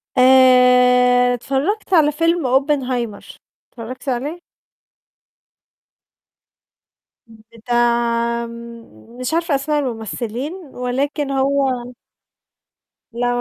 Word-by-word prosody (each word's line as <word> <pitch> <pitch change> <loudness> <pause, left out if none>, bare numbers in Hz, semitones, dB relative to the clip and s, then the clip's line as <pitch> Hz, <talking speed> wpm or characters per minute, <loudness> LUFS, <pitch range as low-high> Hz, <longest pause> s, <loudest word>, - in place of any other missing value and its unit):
آآ، 250 -1 +5
اتفرّجت 280 - -2
على 305 -4 +4
فيلم 330 0 0
Oppenheimer، 255 -7 -3 0.3
اتفرّجتِ 250 +3 -8
عليه؟ 285 +8 -3 2.9
امم، 225 -1 -17 0.2
بتاع 235 0 0
م 235 - -13
مش 255 +3 -3
عارفة 335 -2 0
أسماء 295 +2 -1
الممثلين، 240 - -4
ولكن 280 -3 -4
هو 265 -2 -1 1.2
لأ، 240 +1 -1
250 Hz, 75 wpm, -19 LUFS, 235-280 Hz, 2.9 s, آآ